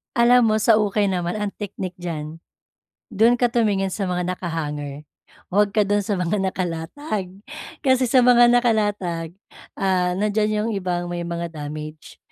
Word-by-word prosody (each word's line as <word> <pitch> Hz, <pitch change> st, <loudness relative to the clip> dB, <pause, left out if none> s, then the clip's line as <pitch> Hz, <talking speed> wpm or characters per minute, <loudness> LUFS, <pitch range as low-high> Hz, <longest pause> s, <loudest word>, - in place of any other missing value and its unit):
Alam 240 Hz, 0 st, +5 dB
mo 215 Hz, -, +2 dB
sa 220 Hz, 0 st, +4 dB
ukay 205 Hz, -1 st, +1 dB
naman 175 Hz, 0 st, -2 dB
ang 210 Hz, -1 st, -2 dB
technique 190 Hz, -3 st, -6 dB
diyan, 160 Hz, -2 st, -6 dB, 0.7 s
do'n 225 Hz, +4 st, +4 dB
ka 245 Hz, -1 st, +1 dB
tumingin 200 Hz, -5 st, +1 dB
sa 195 Hz, -1 st, -2 dB
mga 180 Hz, 0 st, -1 dB
naka-hanger, 150 Hz, -5 st, -5 dB, 0.5 s
huwag 205 Hz, +1 st, +2 dB
ka 210 Hz, -, +4 dB
do'n 205 Hz, +1 st, +1 dB
sa 200 Hz, 0 st, -2 dB
mga 180 Hz, +3 st, -1 dB
nakalatag. 185 Hz, -, -4 dB, 0.5 s
Kasi 260 Hz, -2 st, +3 dB
sa 250 Hz, +1 st, +4 dB
mga 240 Hz, -1 st, +6 dB
nakalatag, 205 Hz, -8 st, 0 dB, 0.4 s
ah, 180 Hz, -2 st, +1 dB
nandiyan 210 Hz, +1 st, 0 dB
yung 230 Hz, -, -1 dB
ibang 180 Hz, -3 st, -2 dB
may 175 Hz, 0 st, -4 dB
mga 170 Hz, 0 st, -4 dB
damage, 155 Hz, 0 st, -8 dB
195 Hz, 150 wpm, -22 LUFS, 175-215 Hz, 0.7 s, mga